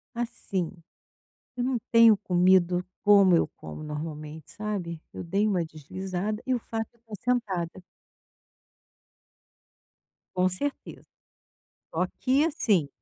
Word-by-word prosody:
assim, 230 -7 -2 0.9
eu 245 - -1
não 255 -1 +1
tenho 230 -2 +8
comido 180 -2 +3 0.2
como 200 -3 +7
eu 165 - +3
como 80 - -8
normalmente, 150 0 -6
sabe. 190 -6 -4
Eu - - -6
dei 195 +5 +1
uma 185 -5 +1
deslizada 185 +7 -4
e 260 - +2
o 245 - +1
fato 225 -1 -4
de 230 - -37
eu 215 - -7
sentada. 195 -8 -1 2.5
Com 185 0 +3
certeza. 275 +11 -5 0.9
Só 180 +3 +2
que 270 +4 +3
assim 210 - +2
190 Hz, 115 wpm, -27 LUFS, 170-225 Hz, 2.5 s, tenho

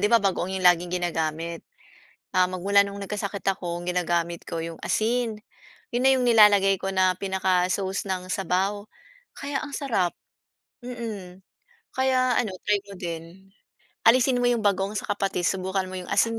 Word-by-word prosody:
'di 210 - +3
ba, 235 - +7
bagoong 190 -3 -1
'yong 185 - -4
laging 175 0 +4
ginagamit? 165 0 -2 0.7
Ah, 185 0 +5
magmula 195 +2 +3
noong 200 0 -7
nagkasakit 200 0 -4
ako, 175 -3 -1
ang - - -9
ginagamit 170 -1 -1
ko 165 -2 -3
'yong 165 0 -6
asin. 225 -1 0 0.5
'Yon 240 - +1
na - - +7
'yong 255 -1 +1
nilalagay 205 -4 +6
ko 195 - -2
na 185 -1 +3
pinaka-sauce 190 0 0
ng 185 -1 -3
sabaw, 195 +2 -1 0.5
kaya 280 -1 -3
ang 290 -2 -7
sarap. 220 -12 0 0.7
Mm. 215 -7 -7 0.5
Kaya 255 -1 +2
ano, 215 -6 0
try 210 - +2
mo 200 - -11
din, 170 +2 -7 0.6
alisin 250 +2 +5
mo 245 - +2
'yong 235 -3 0
bagoong, 200 0 +1
saka 205 0 -2
patis, 195 -3 0
subukan 190 0 -2
mo 185 - -6
'yong 180 -1 -7
asin 225 +3 +2
195 Hz, 160 wpm, -25 LUFS, 180-220 Hz, 0.7 s, ba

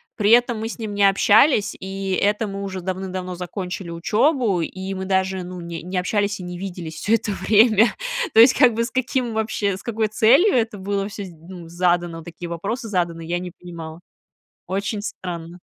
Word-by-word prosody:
При 205 -2 +1
этом 240 -1 +4
мы 225 +1 -3
с - - -8
ним 215 -2 -4
не 205 - +1
общались, 210 +4 +4
и 195 0 -5
это 210 +3 +1
мы 195 0 -5
уже 190 -1 -4
давным-давно 185 0 -4
закончили 180 0 -5
учебу, 210 - +1
и 190 +4 -5
мы 190 - -4
даже, 190 -1 0
ну, 180 0 -8
не 170 -1 -6
не 180 +1 -4
общались 205 +2 0
и 180 - -7
не 180 0 -6
виделись 175 -4 -6
всё 215 +8 +2
это 225 -2 -2
время. 215 +3 +5 0.5
То - - +5
есть, 245 +3 +9
как 245 -3 +5
бы, 230 +1 +1
с - - -7
каким 255 -2 -1
вообще 215 -3 -1
с 190 - -11
какой 220 -2 -1
целью 250 - +4
это 225 -3 0
было 200 +1 -2
всё, 205 -1 -7
ну, 170 +1 -11
задано, 175 -1 0
такие 170 +1 -8
вопросы 205 +9 -4
заданы, 170 -4 -2
я 175 +2 -1
не 180 0 -6
понимала. 165 -2 -9 0.7
Очень 200 +3 -2
странно. 175 -3 -6
195 Hz, 190 wpm, -22 LUFS, 180-220 Hz, 0.7 s, есть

